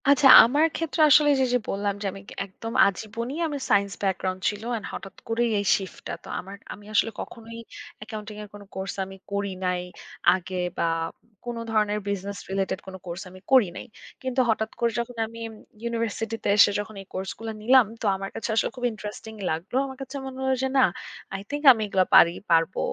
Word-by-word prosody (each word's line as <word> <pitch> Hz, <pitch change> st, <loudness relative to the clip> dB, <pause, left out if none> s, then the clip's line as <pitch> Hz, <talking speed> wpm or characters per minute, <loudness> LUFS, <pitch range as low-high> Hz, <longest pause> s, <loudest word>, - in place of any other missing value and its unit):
আচ্ছা। 280 Hz, -1 st, +6 dB, 0.2 s
আমার 285 Hz, +7 st, +3 dB
ক্ষেত্রে 320 Hz, -2 st, -1 dB
আসলে 295 Hz, +1 st, +7 dB
যে, 260 Hz, -, +4 dB
যে -, -, +5 dB
বললাম 200 Hz, 0 st, -1 dB
যে -, -, -4 dB
আমি 195 Hz, +1 st, -10 dB, 0.2 s
একদম 225 Hz, +4 st, -8 dB
আজীবনী 225 Hz, +5 st, -4 dB
আমি 295 Hz, -2 st, -3 dB
সাইন্স 200 Hz, 0 st, +3 dB
ব্যাকগ্রাউন্ড 185 Hz, -1 st, -1 dB
ছিল। 205 Hz, +1 st, -6 dB
অ্যান্ড 225 Hz, -4 st, -3 dB
হঠাৎ 195 Hz, -1 st, -8 dB
করেই 235 Hz, +1 st, +1 dB
এই 200 Hz, -, -2 dB
শিফট 190 Hz, -2 st, -8 dB
টা। -, -, -4 dB
তো -, -, -13 dB
আমার 195 Hz, +2 st, -8 dB, 0.2 s
আমি 205 Hz, -, -14 dB
আসলে 225 Hz, +1 st, +3 dB
কখনোই 230 Hz, 0 st, -9 dB, 0.4 s
অ্যাকাউন্টিং 215 Hz, 0 st, -7 dB
এর -, -, -9 dB
কোন 205 Hz, -, -10 dB
কোর্স 190 Hz, 0 st, -4 dB
আমি 195 Hz, 0 st, -11 dB
করি 200 Hz, 0 st, -1 dB
নাই 180 Hz, -1 st, 0 dB, 0.5 s
আগে 185 Hz, 0 st, -6 dB, 0.2 s
বা -, -, +1 dB, 0.6 s
কোন 240 Hz, 0 st, -4 dB, 0.2 s
ধরনের 210 Hz, -1 st, +1 dB
বিজনেস 200 Hz, 0 st, -3 dB
রিলেটেড 190 Hz, -1 st, -1 dB
কোনো 190 Hz, 0 st, -7 dB
কোর্স 175 Hz, +1 st, -5 dB
আমি 185 Hz, +1 st, -13 dB
করি 255 Hz, -6 st, +7 dB
নাই। -, -, -7 dB, 0.4 s
কিন্তু 260 Hz, 0 st, -2 dB
হঠাৎ 220 Hz, 0 st, 0 dB
করে 235 Hz, -1 st, +2 dB
যখন 240 Hz, +1 st, -4 dB
আমি 230 Hz, +1 st, -11 dB
ইম 225 Hz, -, -10 dB, 0.3 s
ইউনিভার্সিটি 230 Hz, -1 st, -2 dB
তে -, -, 0 dB
এসে 205 Hz, -, +7 dB
যখন 210 Hz, +1 st, -6 dB
এই 195 Hz, -, -14 dB
কোর্স 190 Hz, +1 st, -4 dB
গুলো 225 Hz, 0 st, -4 dB
নিলাম, 250 Hz, +2 st, +6 dB, 0.2 s
তো -, -, -3 dB
আমার 195 Hz, 0 st, -5 dB
কাছে 225 Hz, -, -4 dB
আসলে -, -, +2 dB
খুব 245 Hz, -, -3 dB
ইন্টারেস্টিং 215 Hz, +1 st, -8 dB, 0.2 s
লাগলো। 165 Hz, +9 st, -4 dB
আমার 265 Hz, -1 st, -8 dB
কাছে 270 Hz, +1 st, -7 dB
মনে 265 Hz, -1 st, -7 dB
হলো 265 Hz, 0 st, +2 dB
যে -, -, +2 dB
না, 265 Hz, -, +6 dB, 0.5 s
"আই 195 Hz, -, -4 dB
থিংক 290 Hz, +1 st, -4 dB
আমি 225 Hz, -, -5 dB
এগুলো 190 Hz, -2 st, +2 dB
পারি 170 Hz, -, +8 dB, 0.2 s
পারবো। 165 Hz, +2 st, +3 dB
215 Hz, 200 wpm, -25 LUFS, 195-235 Hz, 0.6 s, পারি